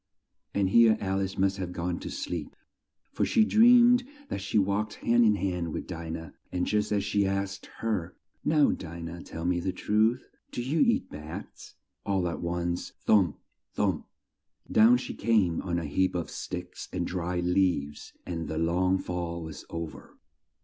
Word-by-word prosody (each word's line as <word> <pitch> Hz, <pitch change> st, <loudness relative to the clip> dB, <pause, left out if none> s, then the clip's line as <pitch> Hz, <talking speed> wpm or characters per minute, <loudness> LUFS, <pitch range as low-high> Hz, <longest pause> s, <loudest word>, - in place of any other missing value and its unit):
And 100 Hz, -2 st, +2 dB
here 115 Hz, -1 st, +6 dB
Al 95 Hz, 0 st, -1 dB
ice 95 Hz, -1 st, -3 dB
must 95 Hz, +1 st, +2 dB
have 90 Hz, -2 st, -4 dB
gone 85 Hz, 0 st, -2 dB
to -, -, -6 dB
sleep, 85 Hz, -4 st, -5 dB, 0.6 s
for -, -, -1 dB
she 220 Hz, -, +4 dB
dreamed 245 Hz, +2 st, +6 dB, 0.3 s
that 100 Hz, -, -3 dB
she 100 Hz, +3 st, -1 dB
walked 100 Hz, +2 st, +1 dB
hand 120 Hz, +1 st, +3 dB
in 105 Hz, -2 st, +5 dB
hand 90 Hz, -4 st, -2 dB
with -, -, -4 dB
Di 85 Hz, -2 st, -6 dB
nah, 80 Hz, -1 st, -5 dB, 0.2 s
and 90 Hz, 0 st, 0 dB
just 105 Hz, 0 st, 0 dB
as 100 Hz, -1 st, +1 dB
she 100 Hz, -1 st, +1 dB
asked 95 Hz, 0 st, -3 dB
her, 100 Hz, -6 st, -2 dB, 0.3 s
"Now, 150 Hz, -2 st, +4 dB
Di 85 Hz, -1 st, -6 dB
nah, 85 Hz, +1 st, -6 dB
tell 80 Hz, +1 st, -6 dB
me 90 Hz, 0 st, +1 dB
the 95 Hz, +2 st, -1 dB
truth, 110 Hz, +6 st, +1 dB, 0.2 s
do 120 Hz, -, -3 dB
you 145 Hz, +6 st, 0 dB
eat 240 Hz, -1 st, +2 dB
bats?" 75 Hz, +1 st, -9 dB, 0.3 s
all 95 Hz, -3 st, 0 dB
at 85 Hz, -, -4 dB
once, 85 Hz, 0 st, -2 dB
thump! 95 Hz, -8 st, +4 dB, 0.4 s
thump! -, -, 0 dB, 0.6 s
down 115 Hz, +3 st, +6 dB
she 125 Hz, -, -5 dB
came 105 Hz, -7 st, +2 dB
on 85 Hz, -2 st, -2 dB
a 85 Hz, -, -2 dB
heap 95 Hz, +6 st, +1 dB
of 85 Hz, -2 st, -3 dB
sticks -, -, -6 dB
and -, -, -2 dB
dry 90 Hz, 0 st, -2 dB
leaves, 90 Hz, -5 st, 0 dB
and 85 Hz, -2 st, -4 dB
the 80 Hz, -, -3 dB
long 90 Hz, +3 st, +2 dB
fall 85 Hz, -2 st, -4 dB
was 80 Hz, -2 st, -8 dB
o 85 Hz, 0 st, -3 dB
ver. 80 Hz, -, -13 dB
95 Hz, 175 wpm, -28 LUFS, 85-105 Hz, 0.6 s, here